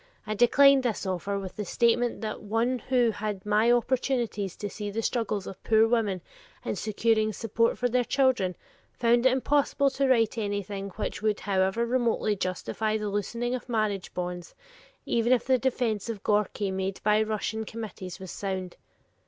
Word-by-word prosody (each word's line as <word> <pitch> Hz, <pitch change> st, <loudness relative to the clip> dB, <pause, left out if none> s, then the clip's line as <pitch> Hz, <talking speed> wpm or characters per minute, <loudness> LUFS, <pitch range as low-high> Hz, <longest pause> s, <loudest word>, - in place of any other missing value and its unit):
I 215 Hz, -, -2 dB
declined 270 Hz, +5 st, +6 dB
this 235 Hz, -5 st, -2 dB
offer 190 Hz, +2 st, -2 dB
with 190 Hz, -2 st, -7 dB
the 210 Hz, -, -2 dB
statement 235 Hz, +4 st, +1 dB
that 215 Hz, -1 st, -4 dB
one 230 Hz, +4 st, 0 dB
who 245 Hz, -2 st, +2 dB
had 210 Hz, -2 st, -4 dB
my 210 Hz, +3 st, +3 dB
opportunities 240 Hz, -5 st, 0 dB
to 205 Hz, -, -5 dB
see 205 Hz, +1 st, -5 dB
the 225 Hz, +3 st, -3 dB
struggles 215 Hz, -5 st, -1 dB
of 190 Hz, -, -9 dB
poor 220 Hz, 0 st, +4 dB
women 215 Hz, -6 st, 0 dB, 0.4 s
in -, -, -1 dB
securing 215 Hz, +2 st, +1 dB
support 230 Hz, +2 st, 0 dB
for 245 Hz, -, +1 dB
their 245 Hz, +1 st, +1 dB
children, 245 Hz, -9 st, +1 dB, 0.4 s
found 240 Hz, +1 st, +3 dB
it -, -, +4 dB
impossible 275 Hz, +1 st, +2 dB
to 275 Hz, +1 st, 0 dB
write 230 Hz, -3 st, +2 dB
anything 200 Hz, -1 st, -3 dB
which 215 Hz, -, -4 dB
would 215 Hz, -1 st, 0 dB
however 190 Hz, +3 st, +1 dB
remotely 235 Hz, -3 st, +1 dB
justify 205 Hz, +3 st, -2 dB
the 210 Hz, -1 st, -3 dB
loosening 235 Hz, +4 st, -2 dB
of 255 Hz, 0 st, -5 dB
marriage 215 Hz, -5 st, -1 dB
bonds, 180 Hz, -1 st, -5 dB, 0.5 s
even 235 Hz, +1 st, +1 dB
if 250 Hz, -3 st, +3 dB
the 260 Hz, -1 st, +3 dB
defense 235 Hz, -5 st, -1 dB
of 215 Hz, -4 st, -5 dB
Gorki 205 Hz, -1 st, 0 dB
made 190 Hz, 0 st, -3 dB
by 210 Hz, 0 st, +4 dB
the 220 Hz, -, +1 dB
Russian 220 Hz, +1 st, -2 dB
committees 205 Hz, -5 st, -7 dB
was 190 Hz, -2 st, -8 dB
sound. 190 Hz, -2 st, -4 dB
220 Hz, 170 wpm, -27 LUFS, 200-240 Hz, 0.5 s, declined